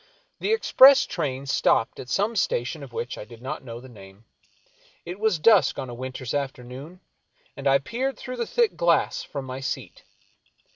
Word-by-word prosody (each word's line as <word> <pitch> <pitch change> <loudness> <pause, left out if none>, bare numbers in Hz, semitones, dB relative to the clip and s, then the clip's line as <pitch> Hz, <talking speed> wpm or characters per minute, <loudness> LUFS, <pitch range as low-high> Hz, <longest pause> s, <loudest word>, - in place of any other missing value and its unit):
The - - -1
express 275 - +7
train 140 -5 -3
stopped 115 -4 +1
at 125 - -8
some 205 - 0
station 145 - -1
of 135 -3 -10
which 120 +1 -5
I - - -6
did 115 +1 -14
not 130 +2 -6
know 120 -2 -8
the 130 - -12
name. 100 -2 -15 0.8
It 180 +3 -7
was 220 -5 +2
dusk 160 - +4
on 130 -3 -5
a - - -7
winter's 130 0 -6
afternoon, 140 +4 -5 0.5
and 140 0 -3
I 135 0 +6
peered 245 - -3
through 255 -1 -7
the 235 - -2
thick 470 -3 +1
glass 170 -1 +2
.from 140 -2 -6
my 130 0 -6
seat. 130 -6 -5
135 Hz, 180 wpm, -25 LUFS, 125-195 Hz, 0.8 s, express